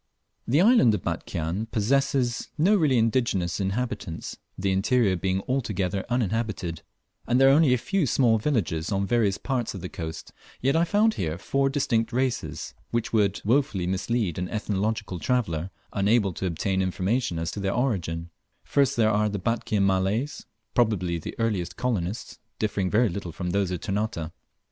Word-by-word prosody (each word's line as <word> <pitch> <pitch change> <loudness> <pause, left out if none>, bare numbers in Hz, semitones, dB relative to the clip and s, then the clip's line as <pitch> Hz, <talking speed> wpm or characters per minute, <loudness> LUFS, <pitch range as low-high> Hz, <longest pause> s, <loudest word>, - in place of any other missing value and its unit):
The 140 +8 +4
island 200 - +6
of - - -5
Batchian 85 +7 -3
possesses 125 +2 +1
no 185 +8 +4
really 150 -9 +3
indigenous 110 -7 +1
inhabitants, 100 -3 -3 0.2
the 95 +1 0
interior 95 +1 +2
being 95 +2 -1
altogether 100 -8 -1
uninhabited; 110 -8 -1 0.5
and 125 +1 +3
there 135 0 +7
are - - +6
only 150 -2 +5
a 125 - +4
few 185 - 0
small 115 -3 +3
villages 100 - -1
on 100 0 +1
various 105 -3 +2
parts 125 -6 -2
of 95 - -6
the 90 - -5
coast; 80 -1 -7 0.3
yet 135 +4 +1
I 165 +1 +4
found 215 +5 +3
here 80 - -2
four 135 +8 0
distinct 125 -5 0
races, 130 0 -2 0.2
which 120 0 -2
would 100 -3 +2
wofully 115 -6 +2
mislead 95 0 -1
an 90 0 -3
ethnological 105 -2 -2
traveller 95 -10 0 0.2
unable 100 -1 +2
to 95 - -3
obtain 95 +3 -1
information 95 +2 0
as 80 0 -2
to - - -6
their 95 0 -1
origin, 85 -9 -1 0.3
first 140 -4 +2
there 110 -2 +4
are 105 0 +2
the 100 - -3
Batchian 105 0 0
Malays, 100 +9 0 0.3
probably 95 -8 +1
the - - -7
earliest 95 -7 -1
colonists, 105 -5 -2 0.2
differing 100 -3 -1
very 115 +5 +3
little 90 -2 -4
from 90 +2 -4
those 100 -1 +1
of 90 -2 -3
Ternate. 100 -5 -2
105 Hz, 165 wpm, -26 LUFS, 95-125 Hz, 0.5 s, there